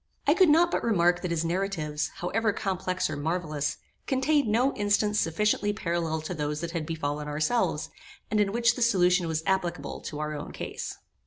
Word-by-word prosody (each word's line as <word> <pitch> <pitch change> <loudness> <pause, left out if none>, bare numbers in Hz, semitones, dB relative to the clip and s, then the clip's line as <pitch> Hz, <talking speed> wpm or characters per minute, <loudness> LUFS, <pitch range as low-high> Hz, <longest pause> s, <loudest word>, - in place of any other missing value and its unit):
I 290 - +5
could 365 -1 +5
not 335 +3 +5
but - - 0
remark 175 -5 +3
that 180 - -3
his 170 -1 0
narratives, 165 -4 -1
however 220 +5 0
complex 185 -2 -1
or 155 - -4
marvellous, 155 -1 -2 0.3
contained 280 +1 +2
no 245 +6 +2
instance 205 +1 +1
sufficiently 205 +5 +1
parallel 170 -5 -1
to 155 +4 -5
those 150 -1 -2
that 170 -1 -4
had 165 -3 -3
befallen 150 -2 -3
ourselves, 155 +11 0 0.4
and 215 - +2
in 200 -1 +2
which 235 +1 +3
the 250 - -5
solution 180 -6 +3
was 160 0 -1
applicable 185 -2 -1
to 150 - -6
our 150 0 -2
own 145 -1 -6
case. - - -5
180 Hz, 180 wpm, -27 LUFS, 160-210 Hz, 0.4 s, I